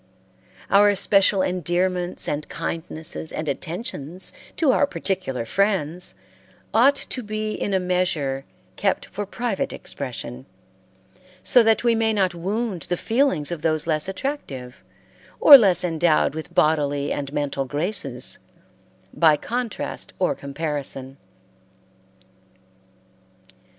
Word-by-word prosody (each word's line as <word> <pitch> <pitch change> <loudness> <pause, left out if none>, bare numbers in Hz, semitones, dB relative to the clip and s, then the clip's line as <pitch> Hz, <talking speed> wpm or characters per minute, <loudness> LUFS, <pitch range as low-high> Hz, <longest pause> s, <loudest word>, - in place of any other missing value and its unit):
Our 205 +1 +6
especial 195 -1 +3
endearments 180 +1 -1
and 150 +1 -3
kindnesses 160 -1 -3
and 155 - -4
attentions 175 - -4 0.2
to 305 -5 +4
our 285 - +3
particular 185 - -3
friends 180 - 0 0.6
ought 265 +5 +5
to 260 - -3
be 215 0 -3
in 205 - -3
a 190 - +2
measure 175 -7 0 0.3
kept 195 -2 0
for 205 0 -6
private 235 -1 -2
expression, 130 -1 -7 1.0
so 245 - +6
that 225 0 +3
we 235 -1 +4
may 225 -1 +1
not 190 -4 +1
wound 195 +2 -3
the 175 - 0
feelings 225 - +1
of 170 -3 -4
those 155 -1 0
less 155 +2 0
attractive, 165 - -5 0.6
or 290 - +11
less 190 - +5
endowed 165 -3 +2
with 160 0 -7
bodily 145 -2 +2
and 140 -1 -3
mental 140 -2 -2
graces, 145 - -3 0.7
by 155 -2 +4
contrast 240 +5 -4
or 185 - +1
comparison. 140 -2 -4
175 Hz, 115 wpm, -23 LUFS, 150-205 Hz, 1.0 s, or